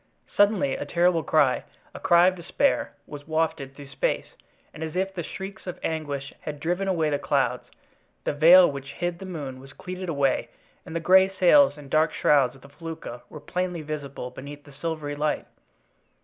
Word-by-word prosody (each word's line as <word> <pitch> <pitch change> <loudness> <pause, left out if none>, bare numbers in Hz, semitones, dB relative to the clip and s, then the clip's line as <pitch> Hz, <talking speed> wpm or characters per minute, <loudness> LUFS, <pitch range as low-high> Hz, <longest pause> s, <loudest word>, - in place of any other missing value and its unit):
Suddenly 205 -9 +3
a - - -4
terrible 175 -1 +2
cry, - - +2 0.3
a - - -8
cry 170 0 +5
of 185 - +4
despair, 185 +10 0
was 145 0 -10
wafted 155 -4 -1
through 140 -1 -11
space; - - -2 0.4
and 155 - -7
as 160 0 -5
if 190 +1 -1
the 175 - -4
shrieks 195 +5 -8
of 180 - -5
anguish 145 -3 -3
had 150 -1 -6
driven 175 +5 -1
away 165 -5 +1
the 145 - 0
clouds, - - 0 0.6
the - - -1
veil 170 +5 +8
which 140 0 -8
hid 175 0 -3
the 190 - -8
moon 145 -7 -6
was 135 +1 -13
cleated 185 0 -6
away 140 -4 +1 0.4
and 160 - -7
the - - +1
gray 190 +3 +5
sails 195 - +5
and 140 -2 -12
dark 155 +1 +3
shrouds 135 -4 +3
of 135 - -17
the 140 - -14
felucca 160 -5 -8
were 150 - -9
plainly 180 +2 -3
visible 140 -4 -6
beneath 145 +3 -10
the 145 -1 -16
silvery 150 0 -4
light. 150 +1 -1
160 Hz, 185 wpm, -25 LUFS, 145-180 Hz, 0.6 s, veil